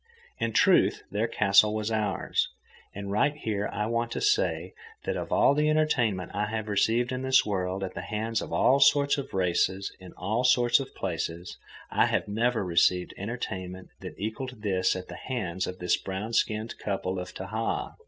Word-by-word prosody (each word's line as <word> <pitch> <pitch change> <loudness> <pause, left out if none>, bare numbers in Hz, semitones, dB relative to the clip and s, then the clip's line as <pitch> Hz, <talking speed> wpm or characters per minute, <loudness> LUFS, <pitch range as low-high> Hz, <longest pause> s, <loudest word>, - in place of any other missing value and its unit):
In 115 - 0
truth, - - +4
their 105 +3 0
castle 105 -1 +4
was 110 +1 -2
ours. 105 -3 0 0.5
And 100 0 -5
right 125 +8 +2
here, 105 -7 -2
I 105 - -2
want 115 +1 -1
to - - -2
say 415 +4 +1 0.3
that - - -1
of - - -5
all - - +5
the 150 +1 +2
entertainment 125 -12 +1
I 105 +1 -1
have 110 0 -3
received 115 +4 +1
in 130 0 -3
this 130 0 +4
world 95 -1 -2
at 95 - -4
the - - -5
hands 110 +1 -2
of - - -7
all 135 +2 +4
sorts 140 +1 +4
of 140 - -6
races 95 +1 0
in 95 -1 -11
all 110 +6 -1
sorts 125 -1 +4
of 135 -1 -7
places, 85 -1 -4 0.4
I - - +3
have - - 0
never 115 0 0
received 90 +1 +2
entertainment 95 -4 -5
that - - -8
equalled 110 +3 -5
this 95 -3 +1
at 90 0 -6
the - - -8
hands 95 -8 -3
of 90 - -6
this 90 -1 +1
brown 100 +4 -5
skinned 110 0 0
couple 95 -2 -2
of 90 - -7
Tahaa. 110 +4 -3
105 Hz, 185 wpm, -28 LUFS, 95-120 Hz, 0.5 s, all